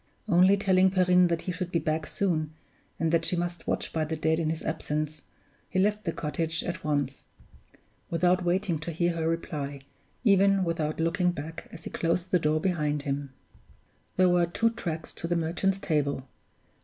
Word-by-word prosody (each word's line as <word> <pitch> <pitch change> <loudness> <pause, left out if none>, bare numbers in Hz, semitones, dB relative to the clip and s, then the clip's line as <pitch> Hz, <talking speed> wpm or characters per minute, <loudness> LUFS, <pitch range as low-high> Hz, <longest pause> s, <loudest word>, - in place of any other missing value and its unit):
Only 185 +3 +5
telling 190 -1 +4
Perrine 180 -1 +4
that 170 -1 -1
he 185 - -2
should 180 0 -4
be - - +2
back 155 -1 -1
soon, 155 -5 -1 0.4
and 165 -1 +1
that 165 -1 +3
she 180 - +1
must 175 0 -3
watch - - -1
by 160 - +1
the 160 +1 -2
dead 160 +1 +1
in 160 -2 0
his 160 0 -3
absence, 155 -1 -2 0.5
he 190 - -3
left 210 +2 +2
the 165 - +1
cottage 160 +1 -2
at 170 -1 -4
once, 145 -3 -1 0.8
without 180 +2 +2
waiting 175 -1 0
to 155 +3 -4
hear 170 +2 +1
her 165 -1 -1
reply, 145 -4 -3 0.4
even 195 -3 +4
without 165 -3 -1
looking 175 +3 +2
back 160 -1 -6
as - - -10
he - - -7
closed 170 +2 -1
the 180 - +4
door 155 0 +2
behind 150 -5 0
him. 140 -1 -3 0.9
There 185 0 +5
were 175 -1 +3
two 230 +7 +1
tracks 165 -8 -5
to 165 - -5
the 175 - 0
Merchant's 170 +4 0
Table. 145 -7 -1
165 Hz, 180 wpm, -28 LUFS, 155-180 Hz, 0.9 s, Only